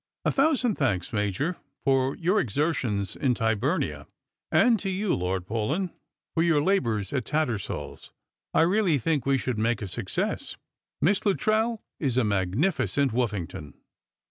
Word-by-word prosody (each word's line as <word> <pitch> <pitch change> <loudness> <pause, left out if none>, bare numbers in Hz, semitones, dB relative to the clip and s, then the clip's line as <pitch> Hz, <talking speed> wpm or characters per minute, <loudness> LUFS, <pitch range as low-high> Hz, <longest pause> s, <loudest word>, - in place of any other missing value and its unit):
A - - +3
thousand 270 -6 +2
thanks, 95 - 0
Major, 105 - -1 0.3
for 135 -1 +2
your 185 +5 +2
exertions 125 - -1
in 130 -3 +1
Tyburnia, 115 - 0 0.4
and 235 -3 +4
to 195 - -3
you, 190 +1 0
Lord 90 0 -1
Paulyn, 135 - -1 0.4
for 165 - +1
your 165 -3 +4
labours 120 - +1
at 135 -3 0
TattersaU's. 140 -8 -3 0.4
I - - +3
really 180 -2 +3
think 140 0 0
we 135 -1 +4
shall 130 -1 -2
make 115 +1 0
a - - -4
success. 90 -3 -3 0.5
Miss 195 +4 +3
LuttreU 215 +3 +1 0.2
is 130 -5 0
a 130 - +4
magnificent 115 - +1
Wotfina^ton." 100 - -3
135 Hz, 140 wpm, -27 LUFS, 105-180 Hz, 0.5 s, and